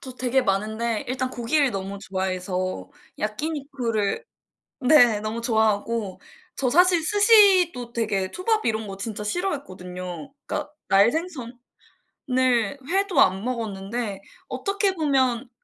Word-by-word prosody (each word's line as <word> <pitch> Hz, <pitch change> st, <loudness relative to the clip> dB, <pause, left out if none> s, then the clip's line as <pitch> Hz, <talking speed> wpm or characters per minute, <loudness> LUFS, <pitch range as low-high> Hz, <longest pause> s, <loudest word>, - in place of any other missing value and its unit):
저 260 Hz, -, -9 dB
되게 255 Hz, +1 st, +1 dB
많은데 220 Hz, +3 st, -1 dB
일단 255 Hz, 0 st, -2 dB
고기를 265 Hz, +3 st, +1 dB
너무 195 Hz, 0 st, -5 dB
좋아해서 185 Hz, -, -3 dB, 0.3 s
야끼니쿠를 255 Hz, -, -2 dB, 0.6 s
네 245 Hz, -6 st, +5 dB
너무 215 Hz, +2 st, -4 dB
좋아하고 220 Hz, -2 st, 0 dB, 0.4 s
저 260 Hz, -, 0 dB
사실 350 Hz, +2 st, +4 dB
스시도 385 Hz, -, +4 dB
되게 205 Hz, -5 st, -1 dB
초밥 435 Hz, +4 st, -1 dB
이런 220 Hz, -1 st, -1 dB
거 195 Hz, -1 st, -7 dB
진짜 210 Hz, +1 st, -5 dB
싫어했거든요. 185 Hz, -, -5 dB
그러니까 300 Hz, -1 st, -3 dB, 0.2 s
날생선을 245 Hz, -, 0 dB, 1.2 s
회도 385 Hz, -3 st, +1 dB
안 190 Hz, +2 st, +3 dB
먹었는데 215 Hz, -3 st, -4 dB, 0.3 s
어떻게 395 Hz, -1 st, -1 dB
보면 265 Hz, -6 st, +1 dB
235 Hz, 270 characters per minute, -24 LUFS, 200-295 Hz, 1.2 s, 네